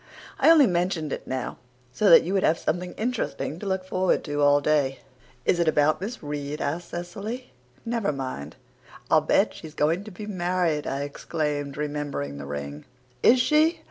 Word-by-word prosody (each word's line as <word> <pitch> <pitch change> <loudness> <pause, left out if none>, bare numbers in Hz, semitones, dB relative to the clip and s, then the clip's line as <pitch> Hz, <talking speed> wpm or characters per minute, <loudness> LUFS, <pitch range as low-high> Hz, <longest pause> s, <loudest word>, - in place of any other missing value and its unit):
I - - +5
only 320 -4 +8
mentioned 175 - 0
it - - -6
now 130 -1 -3 0.4
so 205 +8 +3
that 165 - +9
you 180 - -2
would 195 - +2
have 165 - +3
something 180 +3 -2
interesting 220 -8 -3
to 205 - -6
look 190 -1 -1
forward 185 0 +1
to 145 -2 -2
all 145 0 +5
day." 145 -2 +1 0.4
"Is 175 - +2
it 170 - +2
about 155 +1 +3
Miss 220 0 -5
Reade?" 145 0 -4
asked 165 +5 -3
Cecily. 200 +9 -6 0.3
"Never 230 -7 0
mind." 130 - -5 0.6
"I'll 155 - +6
bet 195 +7 +2
she's 160 -1 -11
going 165 +6 +1
to - - -7
be 205 +3 -8
married," 175 -5 -1
I 135 +1 -2
exclaimed, 145 -1 -3
remembering 145 - -3
the 70 - -7
ring. 70 +1 -6 0.4
"Is 250 +2 +6
she?" 305 +6 +3
160 Hz, 175 wpm, -25 LUFS, 145-190 Hz, 0.6 s, that